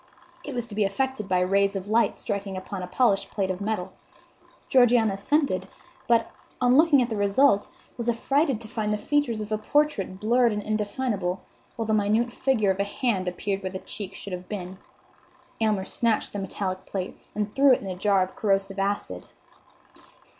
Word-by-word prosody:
It 285 - -6
was 240 -2 -2
to 230 - -10
be 210 +1 +1
effected 215 +1 -2
by 180 -1 +2
rays 200 +2 +2
of 195 0 -4
light 225 +2 +2
striking 200 -1 -4
upon 185 +1 -6
a 180 - -5
polished 200 -1 +2
plate 190 -2 -1
of 185 +1 -5
metal. 200 -3 -2 0.7
Georgiana 240 -4 +4
assented; 235 +1 0 0.4
but, 230 -1 +3 0.3
on 250 0 +4
looking 300 -3 +6
at 240 - -4
the 225 - -2
result, 205 +2 +3 0.3
was 235 -1 -2
affrighted 270 +2 +1
to 225 - -8
find 215 -1 -2
the 210 - +1
features 240 -1 0
of 210 - -5
the 215 -1 -1
portrait 215 -7 0
blurred 235 +2 +3
and 210 0 -3
indefinable; 210 -3 -2 0.3
while 225 - -3
the 220 - 0
minute 215 +3 +2
figure 230 -8 +2
of 190 - -3
a - - +3
hand 200 -2 -1
appeared 195 +2 -2
where 190 - -3
the 190 - -4
cheek 195 0 -7
should 195 - -7
have 180 0 -7
been. 185 -2 -6 0.8
Aylmer 210 -4 +1
snatched 230 +2 0
the 205 - -3
metallic 190 -1 -4
plate 190 -2 -4 0.2
and 210 0 -2
threw 275 0 +5
it 255 - +4
into 190 -2 -4
a - - -8
jar 195 0 +3
of 185 - -7
corrosive 195 -1 0
acid. 195 - -2
210 Hz, 190 wpm, -26 LUFS, 195-235 Hz, 0.8 s, looking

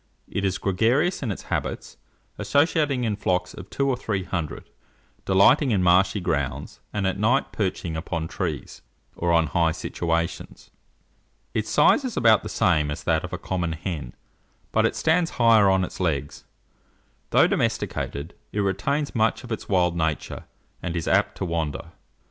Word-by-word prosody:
It 100 - -3
is 95 -1 0
gregarious 120 - +1
in 120 -6 -2
its 95 - -6
habits, - - -3 0.4
associating 145 -3 +2
in 110 -3 0
flocks 90 -2 -1
of 95 +1 -10
two 140 - -1
or 135 - +2
three 105 -6 -2
hundred, 85 -5 -4 0.6
delighting 120 +9 +5
in 100 -5 +2
marshy 95 +3 +4
grounds, 70 -5 -3
and 105 -2 -2
at 95 +1 -1
night 120 +6 +2
perching 90 -5 -2
upon 80 0 -3
trees, 80 -6 -4 0.3
or 85 0 0
on 85 -1 +4
high 80 +2 +1
situations. 85 0 -3 0.8
Its 110 0 -2
size 190 - +4
is 255 -3 -4
about 115 -2 +5
the - - -7
same 75 -5 +2
as 75 - -5
that - - +1
of - - -6
a - - -3
common 85 -3 -2
hen, 80 -7 -5 0.6
but - - +3
it - - -4
stands 165 +1 +2
higher 115 -4 +6
on 95 -1 +3
its - - -6
legs. 75 -6 -2 0.8
Though - - +5
domesticated, 70 +4 -2 0.2
it 105 - -3
retains 140 +10 -1
much 110 +1 +1
of 120 - -10
its 110 - -5
wild 90 -3 +2
nature, 80 -2 -2 0.4
and 90 -1 -4
is 85 - -3
apt - - +2
to - - -2
wander. 80 -6 -3
95 Hz, 165 wpm, -24 LUFS, 85-115 Hz, 0.8 s, higher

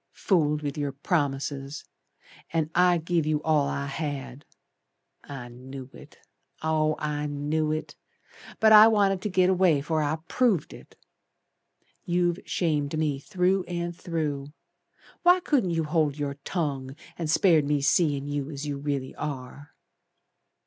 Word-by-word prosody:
Fooled 150 -5 +1
with 145 0 -3
your 145 -2 -2
promises, 140 -2 -2 0.7
And 160 -1 -1
I 180 0 +4
give 165 -1 -1
you 155 -1 +1
all 150 -3 +2
I 140 - -2
had. 140 -2 -5 0.8
I 135 -4 -8
knew 130 +2 -10
it, - - -14 0.5
oh, 155 -1 +1
I 150 0 -2
knew 150 +2 -1
it, 155 0 -4 0.6
But 220 0 +5
I 215 +1 +10
wanted 200 -4 +2
to 210 - -2
git 185 -1 +3
away 185 -5 +3
'fore 155 +2 -1
I 150 +1 0
proved 225 - +1
it. - - -14 1.1
You've 175 0 0
shamed 155 -3 0
me 150 -3 0
through 185 +3 +1
and 175 0 -4
through. 150 -5 -3 0.7
Why 355 +1 +6
couldn't 275 - +1
you 165 -1 0
hold 150 -2 0
your 145 -1 -3
tongue, 140 -6 -3 0.2
And 165 -3 -4
spared 160 -2 +4
me 145 0 +1
seein' 145 -1 +2
you 145 -1 -3
As 145 -1 -6
you 145 -1 -3
really 140 -2 -3
are." 145 -1 -7
150 Hz, 140 wpm, -26 LUFS, 140-175 Hz, 1.1 s, I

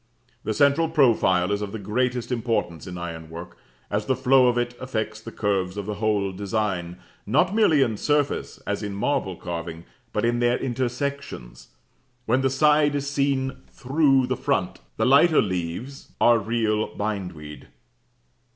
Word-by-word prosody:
The 110 - -2
central 145 +7 +3
profile 110 - +3
is 100 0 0
of 105 0 -5
the - - -3
greatest 125 +4 -1
importance 110 -8 -2
in 90 0 -6
ironwork, 85 0 -7 0.4
as 105 +1 -1
the 130 - +2
flow 130 0 +4
of 120 0 +2
it 120 0 -1
affects 110 -4 -3
the 115 - -9
curves 100 -3 -1
of 100 - -4
the 105 - -3
whole 105 -2 0
design, 95 -3 -2 0.3
not 155 - +2
merely 165 -10 +4
in 110 -4 -2
surface, 145 +2 0
as - - -2
in 100 -1 -4
marble 100 -4 -1
carving, 85 -1 -6 0.3
but - - 0
in 120 0 +1
their 120 0 +2
intersections, 130 - -4 0.6
when 125 +4 +2
the 135 - +2
side 150 +1 +3
is 140 0 -2
seen 140 -2 0
through 135 0 +2
the 130 +1 -1
front. - - -1 0.2
The - - +1
lighter 145 +5 +5
leaves, 95 +8 -3
b - - -29
b, - - +3
are 120 -1 +6
real 110 -1 -1
bindweed. 90 -8 -5
115 Hz, 160 wpm, -24 LUFS, 100-135 Hz, 0.6 s, are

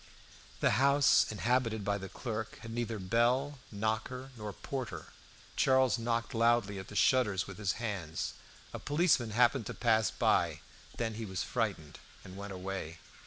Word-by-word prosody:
The - - +3
house 140 -2 +5
inhabited 115 -1 0
by 100 0 0
the 95 0 -7
clerk 110 -1 -5
had 115 - -7
neither 115 -1 -2
bell, 120 +8 +1
knocker, 110 +5 -2
nor 105 -2 -6
porter. 110 - -6 0.5
Charles 130 -2 +3
knocked 115 0 -1
loudly 115 -3 +2
at 95 - -8
the 105 - -10
shutters 105 -4 +3
with 100 -1 -10
his 100 -3 0
hands. 100 -8 -3 0.4
A - - -5
policeman 145 -6 +2
happened 120 +1 +3
to - - -5
pass 110 -2 +3
by. - - +1 0.4
Then 115 -1 -1
he 110 +1 -5
was 95 -2 -2
frightened, 100 - -3 0.2
and 95 - -11
went 100 +1 -7
away. 95 -3 -5
110 Hz, 155 wpm, -32 LUFS, 100-120 Hz, 0.5 s, house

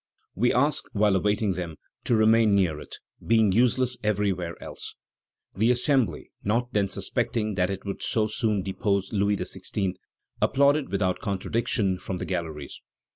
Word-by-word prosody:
We 120 +6 +2
ask, 145 +4 +2
while 105 -2 +3
awaiting 105 +1 +1
them, 85 -3 -5 0.3
to 120 - +3
remain 110 -1 +4
near 90 -6 +1
it, - - -9 0.3
being 110 -3 +3
useless 125 +3 +2
everywhere 95 -5 0
else." - - -8 0.6
The 110 +4 +2
Assembly, 125 0 +1
not 120 +4 0
then 100 -2 +1
suspecting 110 +2 -1
that 90 -1 +1
it 95 0 -5
would 100 - -5
so 110 -2 +1
soon 110 -2 0
depose 100 +1 -1
Louis 100 0 +2
XVI., 95 -1 -3 0.5
applauded 140 +1 +3
without 95 -2 0
contradiction 100 -1 -1
from 95 0 -4
the - - -4
galleries. 80 -6 -5
105 Hz, 145 wpm, -26 LUFS, 95-115 Hz, 0.6 s, remain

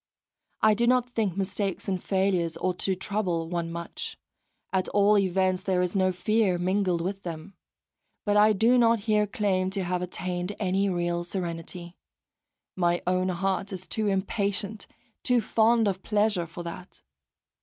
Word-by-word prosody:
I 215 0 +6
do 235 +3 +1
not 250 0 +2
think 210 -6 -1
mistakes 195 -1 -2
and 185 -2 -2
failures 190 -4 +1
ought 185 -1 -2
to 190 - +1
trouble 185 -4 -2
one 170 -1 -2
much; 170 0 -6 0.6
at 185 -1 0
all 205 +1 +4
events 185 -1 +2
there 185 -2 +1
is 180 +2 -2
no 185 -1 +3
fear 190 +1 +1
mingled 185 -1 +1
with 195 +3 -3
them. 170 +2 -7 0.7
But 205 -1 +2
I 210 +1 +6
do 230 +5 +4
not 230 -2 +4
here 210 -1 +2
claim 195 -4 0
to 195 0 -2
have 180 0 -1
attained 180 +2 -3
any 195 0 +1
real 175 -1 -1
serenity 175 -1 -5 0.8
my 175 -1 +1
own 185 +1 +1
heart 195 +2 -1
is 185 -1 -6
too 215 +5 -1
impatient, 200 +1 -2 0.3
too 250 -1 +3
fond 225 +1 +3
of 190 -1 -1
pleasure 210 -5 +1
for 170 +1 -8
that! 175 +2 -9
190 Hz, 155 wpm, -27 LUFS, 180-205 Hz, 0.8 s, I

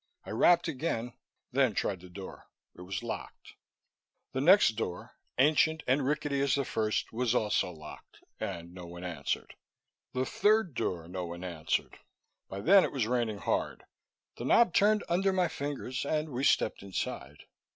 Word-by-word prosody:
I - - -7
rapped 175 0 +4
again, 130 -6 -2 0.4
then 130 -5 +2
tried 95 -3 -1
the 90 +1 -13
door. 95 +1 -10 0.3
It - - -12
was 95 +3 -5
locked. 115 - -7 0.8
The 130 - -2
next 190 +8 +7
door 110 -5 -5 0.2
ancient 155 +3 +3
and 135 +2 +2
rickety 145 0 0
as 140 - +2
the 140 -1 0
first 110 -2 -1
was 125 +1 0
also 105 -5 +1
locked, 75 -3 -12 0.2
and 85 +1 -5
no 90 -1 -9
one 85 +1 -9
answered. 85 -6 -3 0.6
The 130 +1 0
third 210 -2 +2
door, 85 -8 -2
no 90 0 -4
one 85 +1 -7
answered. 85 -3 -2 0.5
By 100 - -5
then 195 - +7
it - - -1
was 130 -6 0
raining 115 -3 0
hard; - - -2 0.5
the - - -5
knob 235 -8 +5
turned 210 +3 +4
under 190 +3 +2
my 185 -2 +2
fingers, 140 -4 -4
and 155 +2 -1
we 130 0 -2
stepped - - +2
inside. 75 -7 -5
125 Hz, 160 wpm, -30 LUFS, 90-150 Hz, 0.8 s, next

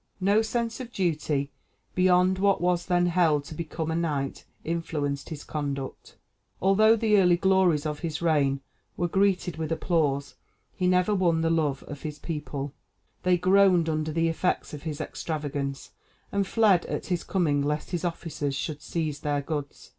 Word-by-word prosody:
No 200 +3 +3
sense 230 +1 -2
of 250 -2 -7
duty 155 - -1 0.4
beyond 185 0 +3
what 200 0 +3
was 175 0 0
then 175 -1 +3
held 165 -4 +3
to 145 - -9
become 160 0 -4
a - - -1
knight 150 -5 -2 0.2
influenced 150 -4 -2
his 150 -2 -7
conduct. 140 -3 -5 0.4
Although 215 +4 +5
the 215 -2 +3
early 180 -2 +5
glories 185 -5 +3
of 150 -1 -2
his 160 -3 -3
reign 145 -5 +2 0.4
were 175 - +1
greeted 185 -3 +1
with 160 -1 -3
applause, 150 -4 0 0.4
he 180 - 0
never 180 +3 +3
won 175 -4 +2
the 165 0 +1
love 150 -4 0
of 145 -1 -9
his 150 -2 -5
people; 145 -4 -5 0.5
they 180 -1 +3
groaned 185 -1 +4
under 155 0 -1
the 165 +1 +1
effects 165 +1 -1
of 150 - -6
his 155 -2 -5
extravagance, 145 -3 -4 0.4
and 200 -1 0
fled 205 -6 +4
at - - -3
his 180 -2 -1
coming 155 -7 +1
lest 150 +1 -2
his 175 -2 -2
officers 160 -5 -3
should 150 +1 -4
seize 155 -4 -3
their 145 -1 -1
goods. 145 -1 -5
165 Hz, 165 wpm, -27 LUFS, 150-185 Hz, 0.5 s, Although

